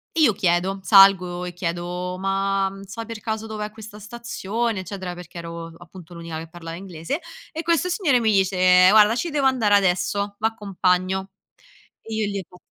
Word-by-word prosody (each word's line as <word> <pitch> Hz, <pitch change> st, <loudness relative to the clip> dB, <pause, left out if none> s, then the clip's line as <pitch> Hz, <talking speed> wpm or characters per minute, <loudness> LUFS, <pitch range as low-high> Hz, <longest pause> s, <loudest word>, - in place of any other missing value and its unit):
io 305 Hz, -9 st, +4 dB
chiedo. 185 Hz, +1 st, 0 dB
Salgo 190 Hz, -3 st, +5 dB
e 180 Hz, -, -6 dB
chiedo: 175 Hz, +1 st, -4 dB
"Ma 195 Hz, 0 st, 0 dB
sai 220 Hz, +4 st, -7 dB
per 230 Hz, -1 st, -8 dB
caso 220 Hz, +1 st, -4 dB
dov'è 215 Hz, -1 st, -5 dB
questa 215 Hz, -1 st, -11 dB
stazione?" 225 Hz, -1 st, -3 dB
Eccetera, 185 Hz, -1 st, -6 dB
perché 175 Hz, -1 st, -11 dB
ero 170 Hz, 0 st, -7 dB
appunto 175 Hz, 0 st, -13 dB
l'unica 170 Hz, -1 st, -7 dB
che 160 Hz, 0 st, -8 dB
parlava 165 Hz, -1 st, -8 dB
inglese 180 Hz, -, -5 dB, 0.3 s
e 320 Hz, -, -3 dB
questo 335 Hz, +1 st, +1 dB
signore 340 Hz, -, +2 dB
mi 225 Hz, -2 st, +2 dB
dice: 185 Hz, -1 st, +5 dB
"Guarda 215 Hz, +2 st, +6 dB
ci 340 Hz, +8 st, -2 dB
devo 290 Hz, -3 st, 0 dB
andare 235 Hz, -6 st, +2 dB
adesso, 200 Hz, +1 st, +1 dB
v'accompagno." 190 Hz, -3 st, 0 dB, 0.7 s
E 225 Hz, -, -8 dB
io 220 Hz, -1 st, 0 dB
gli 200 Hz, -1 st, -3 dB
ho: 180 Hz, -, -17 dB
195 Hz, 165 wpm, -23 LUFS, 180-220 Hz, 0.7 s, Guarda